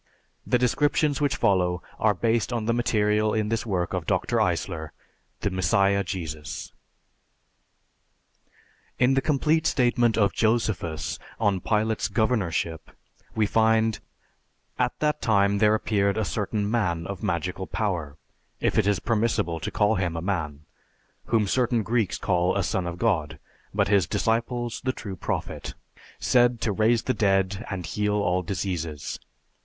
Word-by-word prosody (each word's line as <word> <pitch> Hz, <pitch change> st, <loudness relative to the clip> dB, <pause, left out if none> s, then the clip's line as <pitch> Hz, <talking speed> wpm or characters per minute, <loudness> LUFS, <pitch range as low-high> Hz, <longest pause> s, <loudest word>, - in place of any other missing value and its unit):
The 125 Hz, -, +3 dB
descriptions 145 Hz, +4 st, +1 dB
which 145 Hz, -3 st, +2 dB
follow 90 Hz, -2 st, +1 dB, 0.2 s
are 105 Hz, -2 st, +3 dB
based 115 Hz, +5 st, 0 dB
on 115 Hz, -3 st, -2 dB
the 115 Hz, -, +1 dB
material 105 Hz, -2 st, +1 dB
in 105 Hz, -1 st, 0 dB
this 115 Hz, +1 st, -2 dB
work 90 Hz, -4 st, -1 dB
of -, -, -3 dB
Dr. -, -, 0 dB
Eisler, 80 Hz, -1 st, -2 dB, 0.5 s
"The 100 Hz, -, -1 dB
Messiah 100 Hz, +2 st, +2 dB
Jesus." 80 Hz, -6 st, -6 dB, 2.2 s
In 130 Hz, +1 st, +4 dB
the 135 Hz, -, +2 dB
complete 155 Hz, +3 st, +2 dB
statement 120 Hz, -2 st, +2 dB
of 100 Hz, -3 st, +3 dB
Josephus 110 Hz, -8 st, 0 dB, 0.2 s
on 100 Hz, -4 st, +1 dB
Pilate's 110 Hz, +2 st, 0 dB
governorship, 95 Hz, -8 st, -1 dB, 0.5 s
we 110 Hz, -, +2 dB
find, 110 Hz, 0 st, +2 dB, 0.8 s
"At -, -, 0 dB
that 150 Hz, 0 st, +1 dB
time 100 Hz, -2 st, +3 dB
there 105 Hz, +1 st, +4 dB
appeared 100 Hz, -2 st, 0 dB
a 110 Hz, -, 0 dB
certain 105 Hz, 0 st, -2 dB
man 90 Hz, -8 st, 0 dB
of 100 Hz, +1 st, -6 dB
magical 90 Hz, +2 st, -2 dB
power, 85 Hz, -9 st, -2 dB, 0.4 s
if -, -, +1 dB
it 105 Hz, -, +2 dB
is 105 Hz, -1 st, +2 dB
permissible 105 Hz, -7 st, 0 dB
to -, -, -3 dB
call 105 Hz, 0 st, +2 dB
him 85 Hz, -3 st, -1 dB
a -, -, -1 dB
man, 80 Hz, -7 st, -2 dB, 0.6 s
whom 115 Hz, -3 st, +2 dB
certain 120 Hz, +1 st, +1 dB
Greeks 110 Hz, -2 st, 0 dB
call 90 Hz, 0 st, +1 dB
a 100 Hz, -, +1 dB
Son 90 Hz, -1 st, -1 dB
of 85 Hz, 0 st, -5 dB
God, 80 Hz, -9 st, 0 dB, 0.3 s
but -, -, +1 dB
his 100 Hz, -5 st, +3 dB
disciples, 120 Hz, +3 st, -1 dB
the 130 Hz, 0 st, 0 dB
True 100 Hz, -6 st, -7 dB
Prophet, -, -, -4 dB, 0.4 s
said 120 Hz, -1 st, +3 dB
to 110 Hz, -, 0 dB
raise 110 Hz, +3 st, +2 dB
the 130 Hz, -, 0 dB
dead, 95 Hz, -1 st, +1 dB
and 95 Hz, -3 st, -4 dB
heal 105 Hz, +6 st, -1 dB
all 90 Hz, -3 st, +1 dB
diseases. 85 Hz, -6 st, -4 dB
105 Hz, 145 wpm, -25 LUFS, 90-115 Hz, 2.2 s, In